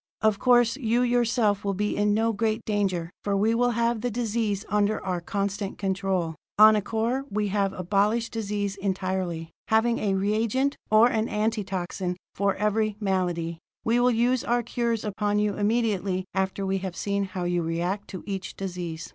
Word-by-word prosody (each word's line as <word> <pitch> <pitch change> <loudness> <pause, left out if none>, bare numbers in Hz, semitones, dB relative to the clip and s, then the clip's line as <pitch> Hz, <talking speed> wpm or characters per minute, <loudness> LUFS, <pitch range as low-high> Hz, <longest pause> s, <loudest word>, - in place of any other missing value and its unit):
"Of 215 -2 +2
course, 245 0 +4
you 240 -2 +1
yourself 235 -4 +2
will 200 -1 -1
be 210 +2 -1
in 205 0 +2
no 225 +1 +2
great 220 +1 0
danger, 190 -5 -1
for 200 -1 0
we 215 +3 +2
will 245 +1 +2
have 235 -1 +1
the 245 - 0
diseases 220 -3 -1
under 210 +1 +1
our 180 -2 -1
constant 200 +2 -3
control. 190 -4 -1 0.2
On 215 +1 +9
Acor 225 +5 -1
we 210 0 -1
have 200 -1 +1
abolished 205 +5 +1
disease 205 -2 -2
entirely, 185 -4 -2 0.2
having 225 +2 +2
a 200 -2 0
reagent 220 +7 +1
or 215 +2 +6
an 220 -1 0
antitoxin 195 -4 -2 0.2
for 200 0 +1
every 210 +1 0
malady; 175 -4 -1 0.3
we 230 +2 +3
will 245 +1 +4
use 245 +1 +2
our 240 0 +1
cures 235 -1 -1
upon 205 0 -1
you 210 0 +1
immediately 205 -3 0
after 190 0 -1
we 195 0 0
have 185 -2 -5
seen 200 -1 -1
how 185 -1 -5
you 175 0 0
react 175 +5 -2
to 185 - -8
each 195 -2 -5
disease. 175 -4 -5
205 Hz, 170 wpm, -26 LUFS, 190-225 Hz, 0.3 s, On